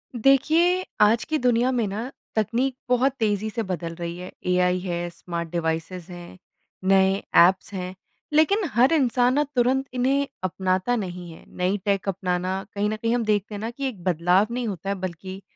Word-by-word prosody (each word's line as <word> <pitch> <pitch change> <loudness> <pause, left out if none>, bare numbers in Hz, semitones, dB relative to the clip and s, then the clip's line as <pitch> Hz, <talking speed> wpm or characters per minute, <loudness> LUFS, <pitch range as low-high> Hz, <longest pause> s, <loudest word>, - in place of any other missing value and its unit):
देखिए, 315 +9 +3 0.2
आज 220 +2 +5
की 315 - -1
दुनिया 245 -1 +2
में 240 -3 +1
ना 220 +7 -4 0.2
तकनीक 235 +5 0
बहुत 250 +2 +3
तेज़ी 215 -1 0
से 225 +1 -3
बदल 175 -4 -4
रही 170 0 -5
है। 180 +1 -8 0.2
एआई 180 0 +2
है, 175 -1 -3
स्मार्ट 170 0 -6
डिवाइसेज़ 170 +1 -3
हैं, 175 +1 -10 0.5
नए 195 +1 +3 0.2
ऐप्स 185 +3 +4
हैं 185 -1 -5 0.4
लेकिन 355 +8 +4
हर 250 +7 +4
इंसान 250 -4 +3
ना 295 +2 +3
तुरंत 255 +2 +2
इन्हें 270 +3 +1 0.2
अपनाता 185 +5 0
नहीं 180 -5 -5
है। 160 - -13
नई 185 +3 +1
टेक 200 -1 0
अपनाना 185 0 -2
कहीं 205 +1 0
न 215 - -1
कहीं 230 +2 -1
हम 240 - 0
देखते 210 0 0
हैं 205 - -6
न 225 - -3
कि 275 +3 -3
एक 210 -9 -7
बदलाव 180 +3 +3
नहीं 245 0 -2
होता 195 -2 -4
है 200 - 0
बल्कि 185 +1 -6
200 Hz, 180 wpm, -24 LUFS, 180-245 Hz, 0.5 s, आज